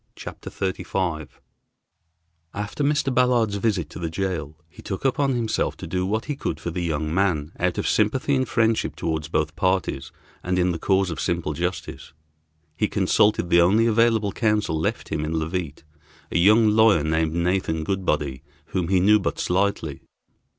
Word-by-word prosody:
CHAPTER - - -8
XXXV 95 -2 -3
THE - - -7
TRIAL 85 -6 -2 1.3
After 105 +8 -3
Mr. 145 -2 +1
Ballard's 120 -5 +2
visit 100 -6 0
to - - -8
the 85 -2 -3
jail, 80 -4 -3
he 80 - -15
took 95 +5 -5
upon 135 0 +1
himself 115 -2 -1
to - - -7
do 90 +2 -2
what 110 +3 -1
he 145 - -3
could 80 - -4
for 85 - -4
the 90 - -3
young 80 -2 -2
man, 85 -5 0
out 90 -1 0
of - - -1
sympathy 110 +6 +1
and 130 -2 +1
friendship 110 -1 +1
toward 80 -2 -3
both 75 0 0
parties, 95 -7 -1 0.3
and 90 0 -1
in 90 0 +2
the 85 - -4
cause 95 -1 +1
of 80 - -5
simple 85 -4 -1
justice. 90 +4 -4 0.6
He 105 +6 +1
consulted 100 -2 +2
the 85 - +6
only 105 +7 +4
available 115 -2 +2
counsel 105 -8 0
left 80 - -2
him 75 - -2
in 80 +1 -3
Leauvite, 80 -1 -3 0.5
a - - +1
young 110 +4 +5
lawyer 110 -7 +4
named 80 0 0
Nathan 85 -2 0
Goodbody, 75 -8 -1 0.3
whom 90 -3 -1
he 95 0 +3
knew 105 +4 +5
but 95 - -2
slightly. 90 -6 -1
90 Hz, 175 wpm, -23 LUFS, 80-105 Hz, 1.3 s, the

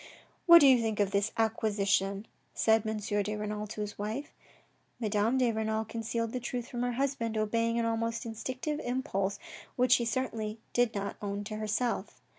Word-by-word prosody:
" - - -36
What 340 -1 +10
do 285 - +8
you 255 -3 +6
think 220 -2 -1
of 200 -1 +2
this 200 +2 +1
' - - -18
acquisition? 205 -3 +1
' - - -41
" - - -41
said 220 0 +4
M. 220 0 -1
de 205 0 -1
Renal 210 0 -4
to 215 0 -6
his 210 -1 -5
wife. 220 +8 -4 0.7
Madame 220 +2 +1
de 250 -2 +3
Renal 220 0 -1
concealed 230 0 -3
the 255 - -2
truth 245 0 -4
from 240 - -4
her 245 0 0
husband, 240 -4 -1
obeying 230 +2 +1
an 235 - +1
almost 230 +1 -1
instinctive 255 +6 -4
impulse 200 -7 -1 0.4
which 250 -1 +2
she 240 -1 +5
certainly 225 -3 -2 0.2
did 245 -2 +2
not 200 0 -3
own 200 0 -3
to 215 +1 -5
herself. 215 +3 -2
225 Hz, 195 wpm, -30 LUFS, 210-240 Hz, 0.7 s, What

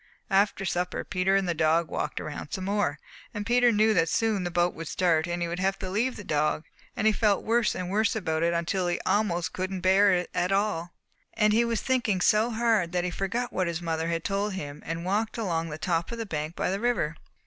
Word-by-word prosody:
"After 195 0 +2
supper 180 0 -1
Peter 185 +1 +1
and 195 -1 +1
the 175 - +1
dog 160 +1 +2
walked - - -2
around 150 -1 -7
some 190 - -3
more, 200 -8 0 0.4
and 205 0 -3
Peter 245 +1 +4
knew 215 0 +3
that 165 -5 +2
soon 215 +1 +1
the 175 - -2
boat 175 0 +1
would 165 0 -7
start 170 -3 +1
and 175 0 -2
he - - -1
would 170 +1 -4
have 195 +1 +1
to 185 - -5
leave 235 +6 0
the 205 - -8
dog 150 -1 0 0.3
and 215 - -2
he 220 - +5
felt 210 -2 +2
worse 230 0 +2
and 185 0 -4
worse 220 +3 +2
about 160 -7 -1
it 170 0 +2
until 175 +2 0
he 175 - 0
almost 180 -4 0
couldn't 185 0 -3
bear 195 +2 +5
it 180 -1 0
at 180 +2 0
all. 195 -4 0 0.4
"And 215 -1 +3
he 230 +2 +4
was 235 -1 -1
thinking 240 -7 +1
so 215 +5 +3
hard 220 -6 +1
that 180 -1 +1
he 180 - -2
forgot 235 +7 -2
what 185 -1 0
his 170 -1 -2
mother 165 -1 -2
had 165 0 -2
told 200 +1 -1
him, 145 -5 -6
and 165 +1 -4
walked 215 +5 -1
along 165 -7 -1
the 150 - -5
top 165 +2 -1
of 235 - -4
the 230 - -3
bank 155 -3 -4
by - - -1
the 195 - -1
river. 220 -10 0
185 Hz, 235 wpm, -27 LUFS, 170-210 Hz, 0.4 s, he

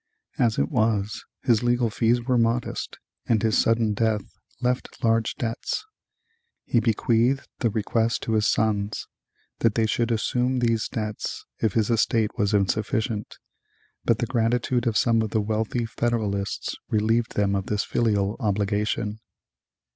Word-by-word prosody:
As 115 -3 +2
it 70 +2 0
was, 110 -3 0 0.2
his 115 -4 +3
legal 120 -1 +1
fees 120 +2 +2
were 125 +1 +1
modest 115 +1 -1 0.3
and 110 -2 +2
his 110 -1 +2
sudden 115 -2 +3
death 110 -1 +1 0.4
left 125 +1 -2
large 115 -1 +2
debts. 120 - -3 0.8
He 120 - +2
bequeathed 120 +3 +1
the 115 - +2
request 115 +2 0
to 115 - -1
his 105 -1 +3
sons 105 -1 0 0.5
that 115 -2 +2
they 115 - +3
should 115 +2 0
assume 125 +3 +1
these 115 -3 +1
debts 110 -1 -4
if 110 -4 +1
his 110 0 +1
estate 110 -1 +2
was 105 -3 +1
insufficient, 105 +2 0 0.7
but 115 - +2
the 120 - -1
gratitude 120 +1 0
of 115 - +2
some 115 -2 +3
of 110 - -1
the 110 - +1
wealthy 110 +3 -1
Federalists 110 -4 -2
relieved 110 +2 +1
them 100 -1 +2
of 95 -1 -1
this 105 -1 0
filial 105 -3 0
obligation. 105 0 -1
110 Hz, 145 wpm, -25 LUFS, 105-120 Hz, 0.8 s, his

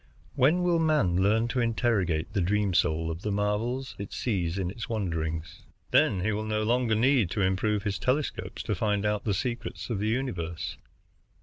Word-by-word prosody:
When 160 +8 +3
will 175 -2 +3
man 150 - +2
learn 110 +4 +3
to 125 - -1
interrogate 105 -8 0
the 100 - +1
dream 100 +2 +1
soul 80 -1 +1
of 80 +2 -6
the 105 - -2
marvels 105 +6 -1
it 100 - -6
sees 95 -7 -1
in 90 -2 -1
its 115 - -7
wanderings? 80 -7 -3 0.3
Then 95 - +4
he 105 +4 +1
will 105 +1 -2
no 110 0 0
longer 120 0 +2
need 120 -3 +3
to 100 - -2
improve 100 +2 +1
his 100 -3 -2
telescopes 135 +7 -1
to - - -1
find 105 -1 0
out 105 -1 0
the 100 -3 +1
secrets 120 +3 -4
of 105 - -1
the 105 - -1
universe. 95 -9 -2
105 Hz, 185 wpm, -28 LUFS, 95-120 Hz, 0.3 s, Then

